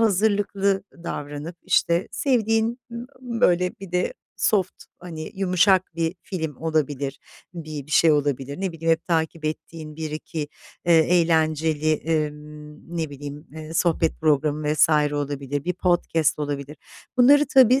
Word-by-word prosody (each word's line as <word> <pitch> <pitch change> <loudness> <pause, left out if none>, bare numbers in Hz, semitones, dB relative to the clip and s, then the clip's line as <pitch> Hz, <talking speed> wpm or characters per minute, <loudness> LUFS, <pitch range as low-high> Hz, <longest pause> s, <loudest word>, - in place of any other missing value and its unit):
hazırlıklı 200 -2 +2 0.2
davranıp, 150 +3 -5
işte, 170 +2 +2
sevdiğin, 230 -2 +1 0.4
böyle 205 -8 +2
bir 190 -2 -9
de 180 0 0 0.2
soft, 195 -5 0
hani, 160 -3 -7
yumuşak 185 -1 +3
bir 165 +1 -1
film 160 -7 -4
olabilir, 145 -4 -1 0.4
bir 155 -4 -6
bir - - -14
şey 160 +1 +5
olabilir. 140 +1 -1
Ne 190 -3 -2
bileyim, 165 0 +1
hep 165 - -2
takip 160 -2 -1
ettiğin 155 0 -5
1-2 155 -1 -5 0.4
eee, 170 - +6
eğlenceli, 160 -2 +2 0.3
ımm, 150 +2 -11
ne 160 -3 -2
bileyim, 145 +2 -8
eee, 160 +1 -8
sohbet 165 -1 +1
programı 150 0 +1
vs. - - +5 0.2
olabilir, 145 -1 -3
bir 180 - 0
podcast 175 -4 +1
olabilir. 145 0 -4 0.4
Bunları 285 +4 +6
tabii 260 0 +6
160 Hz, 130 wpm, -24 LUFS, 150-180 Hz, 0.4 s, eee